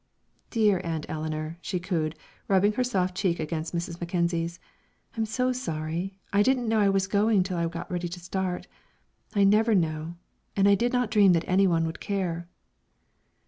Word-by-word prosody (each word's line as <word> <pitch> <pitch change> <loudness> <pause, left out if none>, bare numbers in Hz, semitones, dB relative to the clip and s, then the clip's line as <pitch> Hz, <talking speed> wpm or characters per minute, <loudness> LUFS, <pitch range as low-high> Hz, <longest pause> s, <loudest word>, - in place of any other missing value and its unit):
"Dear 210 -5 +3
Aunt 160 -2 -3
Eleanor," 155 +1 -4
she 180 -1 -2
cooed, 165 -4 -1 0.3
rubbing 200 +2 +3
her 250 - +1
soft 185 -7 0
cheek 185 -3 0
against 160 +1 -3
Mrs. 170 0 -3
Mackenzie's, 170 -1 -1 0.6
"I'm 225 -1 -1
so 250 +3 0
sorry. 170 -4 -3 0.2
I 200 - +5
didn't 250 +1 +2
know 220 0 +2
I 200 -1 +4
was 195 -1 +2
going 200 0 +3
till 180 -2 -3
I 170 - +1
got 170 +2 -6
ready 175 -1 -2
to 180 +1 -7
start, 180 0 -3 0.7
I 200 - +4
never 215 +3 +4
know, 160 -1 -1 0.4
and 200 0 +4
I 200 - +6
did 240 +5 +2
not 250 -2 0
dream 200 -4 +6
that 165 -1 +1
any 190 +1 +4
one 165 -2 +2
would 160 0 -5
care." 175 -4 -3
185 Hz, 180 wpm, -27 LUFS, 170-205 Hz, 0.7 s, I